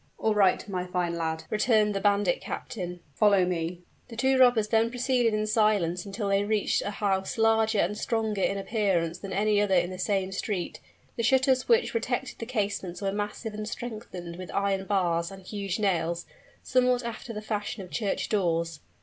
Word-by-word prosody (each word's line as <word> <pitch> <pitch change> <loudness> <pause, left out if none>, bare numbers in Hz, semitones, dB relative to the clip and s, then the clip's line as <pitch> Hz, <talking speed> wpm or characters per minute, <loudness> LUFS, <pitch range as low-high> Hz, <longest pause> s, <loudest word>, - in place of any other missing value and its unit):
"All 220 - +1
right, 200 -2 +3
my 180 -2 -3
fine 180 -2 -1
lad," 160 -1 -2
returned 215 -1 +3
the 195 - -1
bandit 205 - +2
captain. 180 -5 -5
"Follow 200 +2 +4
me." 175 0 -3 0.2
The 230 - -10
two 265 +3 +2
robbers 245 -4 +5
then 225 +1 +3
proceeded 245 -1 +1
in 215 0 0
silence 210 -5 +1
until 200 +1 -3
they 200 0 +3
reached 210 0 +1
a - - -3
house 195 -1 -1
larger 225 0 +3
and 200 +2 +1
stronger 220 -2 -1
in 195 - +1
appearance 195 -5 0
than 195 0 -7
any 205 +1 +2
other 200 -2 +2
in 175 0 +2
the 185 - -7
same 190 -1 0
street. 195 -2 -3 0.4
The - - 0
shutters 260 +2 +3
which 465 0 +4
protected 460 - -2
the 230 - -5
casements 200 -6 -2
were 195 -1 -1
massive 210 +2 -4
and 215 0 -5
strengthened 200 -8 -7
with 185 -1 -8
iron 195 -1 0
bars 175 -4 +1
and 195 -1 -11
huge 200 -2 -3
nails, 170 -5 0 0.4
somewhat 250 -1 +2
after 235 0 -6
the 210 - -4
fashion 210 -1 -4
of 180 - -12
church 210 -4 -1
doors. 170 -5 0
205 Hz, 185 wpm, -27 LUFS, 185-220 Hz, 0.4 s, robbers